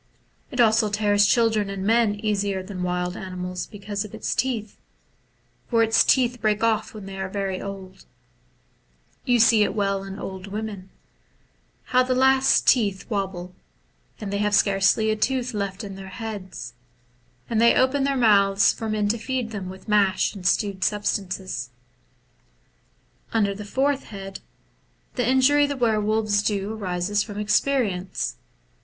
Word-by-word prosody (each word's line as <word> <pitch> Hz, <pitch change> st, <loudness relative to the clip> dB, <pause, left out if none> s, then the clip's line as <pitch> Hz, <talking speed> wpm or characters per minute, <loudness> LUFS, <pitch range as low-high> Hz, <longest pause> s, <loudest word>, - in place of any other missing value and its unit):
It 250 Hz, -, -7 dB
also 220 Hz, -2 st, +4 dB
tears 205 Hz, -1 st, +3 dB
children 220 Hz, -4 st, +2 dB
and 195 Hz, -1 st, -4 dB
men 225 Hz, -1 st, +3 dB
easier 205 Hz, -2 st, -1 dB
than 185 Hz, -1 st, -7 dB
wild 180 Hz, 0 st, -2 dB
animals, 180 Hz, -1 st, -5 dB
because 205 Hz, -1 st, -5 dB
of 210 Hz, 0 st, -9 dB
its 220 Hz, -, -2 dB
teeth, 230 Hz, -5 st, -2 dB, 0.9 s
for 230 Hz, -2 st, +3 dB
its 225 Hz, 0 st, +4 dB
teeth 245 Hz, -2 st, +2 dB
break 215 Hz, 0 st, +1 dB
off 220 Hz, -1 st, 0 dB
when 205 Hz, -2 st, -8 dB
it 195 Hz, 0 st, -5 dB
is 190 Hz, -, -6 dB
very 195 Hz, -2 st, -3 dB
old; 190 Hz, -1 st, -9 dB, 1.2 s
you 245 Hz, -2 st, +3 dB
see 225 Hz, -1 st, +5 dB
it 210 Hz, -, +1 dB
well 195 Hz, -2 st, 0 dB
in 195 Hz, 0 st, -8 dB
old 190 Hz, -1 st, -7 dB
women: 205 Hz, -2 st, -6 dB, 0.9 s
how 255 Hz, -, +2 dB
the 255 Hz, 0 st, 0 dB
last 265 Hz, +1 st, +4 dB
teeth 205 Hz, -6 st, +3 dB
wobble, 190 Hz, -3 st, -3 dB, 0.7 s
and 205 Hz, -2 st, -5 dB
thev 200 Hz, -, -1 dB
have 210 Hz, 0 st, +2 dB
scarcely 200 Hz, +2 st, +3 dB
a -, -, +1 dB
tooth 250 Hz, +2 st, -1 dB
left 200 Hz, 0 st, -3 dB
in 200 Hz, -1 st, -7 dB
their 190 Hz, 0 st, -9 dB
heads, 190 Hz, -, -7 dB, 0.7 s
and 225 Hz, -1 st, 0 dB
they 235 Hz, -, +5 dB
open 260 Hz, +2 st, +2 dB
their 275 Hz, 0 st, 0 dB
mouths 200 Hz, -4 st, +4 dB
for 225 Hz, -1 st, -5 dB
men 210 Hz, -1 st, 0 dB
to 230 Hz, +2 st, 0 dB
feed 250 Hz, -1 st, -3 dB
them 195 Hz, -4 st, -5 dB
with 190 Hz, +3 st, -11 dB
mash 200 Hz, -3 st, +2 dB
and 190 Hz, -3 st, -3 dB
stewed 195 Hz, -1 st, 0 dB
substances. 190 Hz, -, -2 dB, 1.6 s
Under 205 Hz, -3 st, +2 dB
the 210 Hz, +1 st, -8 dB
fourth 275 Hz, +5 st, 0 dB
head, 195 Hz, -2 st, -8 dB, 0.7 s
the 245 Hz, -1 st, 0 dB
injury 285 Hz, +3 st, +4 dB
the 285 Hz, -1 st, -4 dB
were 225 Hz, -4 st, +2 dB
wolves 215 Hz, -1 st, +1 dB
do 205 Hz, 0 st, -2 dB
arises 200 Hz, -1 st, -1 dB
from 205 Hz, -1 st, -6 dB
experience. 205 Hz, -3 st, 0 dB
205 Hz, 155 wpm, -24 LUFS, 195-225 Hz, 1.6 s, see